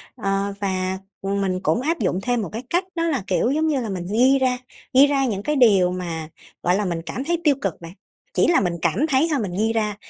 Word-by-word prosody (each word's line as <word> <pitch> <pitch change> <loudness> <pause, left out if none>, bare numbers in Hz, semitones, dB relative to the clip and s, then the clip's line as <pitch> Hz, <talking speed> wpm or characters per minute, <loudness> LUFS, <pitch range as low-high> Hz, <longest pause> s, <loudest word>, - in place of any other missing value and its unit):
Ờ, 195 -2 -1
và, 190 -1 -1 0.2
ừm, 200 +1 -1
mình 185 -1 -1
cũng 235 - +1
áp 330 +5 -1
dụng 185 - 0
thêm 245 0 0
một 195 - -4
cái 225 +4 -5
cách 350 +2 +1
đó 330 - 0
là, 275 - -1
kiểu 195 +6 +1
giống 310 +3 +1
như 285 -5 +1
là, 225 - -4
mình 180 -2 -4
ghi 260 +5 +4
ra 255 -1 +1 0.4
ghi 275 +2 +7
ra 275 -1 +1
những 205 -5 -2
cái 300 - 0
điều 200 -8 +5
mà, 165 -3 -4 0.3
gọi 180 +1 +3
là, 205 0 0
mình 170 -2 -2
cảm 255 - -4
thấy 340 +3 -1
tiêu 290 -3 +4
cực 190 -5 -3
bạn. 165 +1 -9 0.4
Chỉ - - +3
là 345 - +4
mình 175 -2 0
cảm 260 +11 +1
thấy 275 +4 +3
thôi, 285 - +1
mình 195 - -3
ghi 225 +2 +1
ra 215 -2 0
215 Hz, 255 wpm, -22 LUFS, 190-270 Hz, 0.4 s, ghi